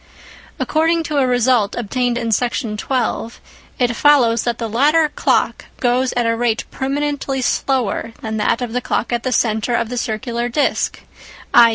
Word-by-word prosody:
According 325 Hz, +2 st, +1 dB
to 295 Hz, -2 st, -1 dB
a 260 Hz, -, +2 dB
result 245 Hz, -4 st, +2 dB
obtained 245 Hz, +2 st, -1 dB
in 230 Hz, -2 st, -2 dB
Section 235 Hz, 0 st, -1 dB
12, 235 Hz, 0 st, -2 dB, 0.4 s
it 240 Hz, -2 st, +1 dB
follows 240 Hz, -5 st, +4 dB
that 240 Hz, -1 st, -1 dB
the 230 Hz, -, -3 dB
latter 295 Hz, +8 st, +3 dB
clock -, -, 0 dB
goes 250 Hz, +1 st, +1 dB
at 240 Hz, -1 st, 0 dB
a 230 Hz, 0 st, +1 dB
rate 230 Hz, -1 st, 0 dB
permanently 275 Hz, -1 st, -2 dB
slower 245 Hz, -4 st, 0 dB
than 220 Hz, -1 st, -3 dB
that 230 Hz, +3 st, +1 dB
of 235 Hz, -2 st, -5 dB
the 250 Hz, -, -1 dB
clock 235 Hz, 0 st, -2 dB
at 240 Hz, -, 0 dB
the 255 Hz, -, -2 dB
centre 220 Hz, 0 st, +1 dB
of 230 Hz, -, -1 dB
the 245 Hz, -1 st, -2 dB
circular 235 Hz, +2 st, -2 dB
disc, 285 Hz, +5 st, 0 dB, 0.5 s
i. 235 Hz, -1 st, +8 dB
245 Hz, 170 wpm, -19 LUFS, 230-265 Hz, 0.5 s, i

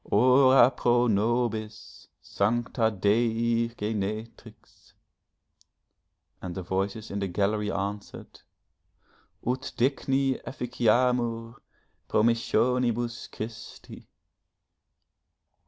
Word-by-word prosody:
'Ora 130 Hz, +2 st, +6 dB
pro 120 Hz, -1 st, +2 dB
nobis, 110 Hz, 0 st, -2 dB, 0.2 s
Sancta 115 Hz, +2 st, 0 dB
Dei 115 Hz, +3 st, +1 dB
Genetrix!' 110 Hz, -1 st, -6 dB, 1.5 s
and 90 Hz, -2 st, -6 dB
the 95 Hz, -, -5 dB
voices 100 Hz, +4 st, -3 dB
in 100 Hz, -, -3 dB
the 100 Hz, -, -2 dB
gallery 105 Hz, +3 st, -1 dB
answered: 100 Hz, +1 st, -6 dB, 1.1 s
'Ut 130 Hz, +3 st, -2 dB
digni 135 Hz, +1 st, 0 dB
efficiamur 120 Hz, -1 st, 0 dB, 0.6 s
promissionibus 120 Hz, +1 st, +1 dB
Christi.' 110 Hz, +1 st, -9 dB
115 Hz, 70 wpm, -27 LUFS, 105-120 Hz, 1.5 s, Ora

